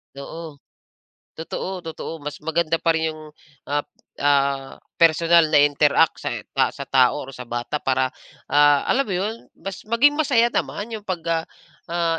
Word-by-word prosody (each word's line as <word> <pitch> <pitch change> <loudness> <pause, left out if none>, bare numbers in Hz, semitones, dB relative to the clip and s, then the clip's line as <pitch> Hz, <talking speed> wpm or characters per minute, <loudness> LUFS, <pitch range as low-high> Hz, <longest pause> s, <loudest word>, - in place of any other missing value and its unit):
Totoo. 155 +2 -8 0.8
Totoo, 185 +3 -4
totoo. 165 0 -6
Mas 145 -1 -7
maganda 165 +1 0
pa 165 - +3
rin 160 0 -1
yung, 155 - -11 0.5
ah 145 0 0
p - - -54 0.3
ah, 140 -1 +1 0.2
personal 165 0 +5
na 150 -2 +5
interact 145 0 +3
sa, - - -3
eh, - - -6 0.3
sa - - -7
tao 130 -2 +3
or 135 - -9
sa 125 -2 -9
bata 120 +5 -3
para, 130 -2 0 0.4
ah, 145 -1 +5
alam 275 +2 +2
mo 195 - -3
'yon, 200 +5 -1 0.2
mas 195 +2 -8
maging 275 +7 +3
masaya 245 -6 +3
naman 220 -1 -3
yung 215 -2 -7
pag, 180 -3 -3
ah, 165 -1 0 0.4
ah, 170 -1 0
160 Hz, 165 wpm, -22 LUFS, 145-180 Hz, 0.8 s, personal